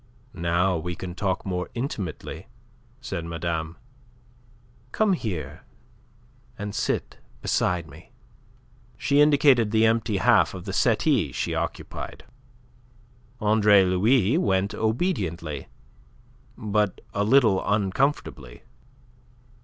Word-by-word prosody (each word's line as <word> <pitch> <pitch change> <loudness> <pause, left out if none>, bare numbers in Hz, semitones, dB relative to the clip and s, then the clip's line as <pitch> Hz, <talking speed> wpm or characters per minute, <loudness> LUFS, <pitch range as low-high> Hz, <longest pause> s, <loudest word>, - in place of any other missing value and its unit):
"Now 85 +2 +1
we 85 +2 -4
can 90 -1 -7
talk 95 0 -2
more 90 -2 -3
intimately," 95 - -5 0.5
said 85 -9 -4
madame. 85 0 -4 1.1
"Come 215 -3 +2
here, 105 - -4 1.0
and 105 0 -5
sit - - -2 0.2
beside 85 -2 0
me." - - -15 0.9
She 140 +1 +3
indicated 140 -6 +5
the 110 +1 +3
empty 110 -2 +1
half 95 - +3
of 90 0 -8
the 95 - -5
settee 115 - +2
she - - -2
occupied. - - -5 1.2
Andre 105 -2 +5
Louis 105 - +3
went 100 - +1
obediently, 95 - -2 0.9
but 105 -2 0
a 100 - 0
little 110 -4 +4
uncomfortably. 100 - -1
100 Hz, 100 wpm, -25 LUFS, 90-115 Hz, 1.2 s, indicated